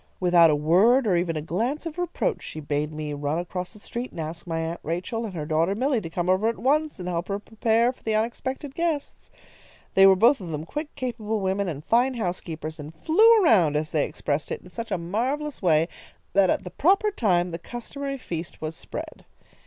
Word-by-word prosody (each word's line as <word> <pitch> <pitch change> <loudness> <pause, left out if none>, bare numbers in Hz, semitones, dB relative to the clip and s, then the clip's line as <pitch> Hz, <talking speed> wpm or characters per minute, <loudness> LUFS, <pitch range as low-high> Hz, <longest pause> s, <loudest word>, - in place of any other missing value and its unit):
Without 175 -2 +6
a 150 - +3
word, 195 - +4
or 195 -4 +3
even 170 -1 0
a 150 - -3
glance 235 - -2
of 330 +1 -5
reproach, 355 +6 -1
she 155 - -7
bade 150 0 -2
me 155 -1 -4
run 145 +2 -2
across 180 +1 -4
the - - -14
street 240 +4 -5
and - - -10
ask 165 +2 -6
my 165 -1 -2
Aunt 165 +1 -3
Rachel 185 +8 -3
and 200 -4 -7
her 155 -3 -3
daughter 165 +5 +1
Milly 255 +1 +1
to 165 - -6
come 175 +1 -2
over 185 +4 +3
at 230 - 0
once 300 0 +1
and 180 - -5
help 175 0 -2
her 200 - -1
prepare 225 +3 +1
for - - -27
the 220 -1 -1
unexpected 260 +5 -2
guests. 325 -2 -2 0.6
They 195 0 +7
were 190 - +7
both 235 +5 +4
of 180 - -7
them 155 0 -4
quick, 300 - -5
capable 230 -5 -3
women 195 0 0
and 155 -3 -5
fine 250 +3 +3
housekeepers, 165 -6 -4
and 150 +2 -8
'flew 435 - +5
around,' 180 - +4
as 155 +1 -1
they 150 - +2
expressed 145 0 -3
it, - - -3
in 180 - -14
such 225 +6 -5
a 190 - 0
marvellous 255 - -2
way 165 -3 +3 0.5
that 195 -2 +4
at - - +1
the 180 - -8
proper 395 +6 +3
time 180 - +1
the 165 - -5
customary 275 +7 -6
feast 170 -9 -6
was 155 +1 -4
spread. - - -7
190 Hz, 215 wpm, -25 LUFS, 165-250 Hz, 0.6 s, They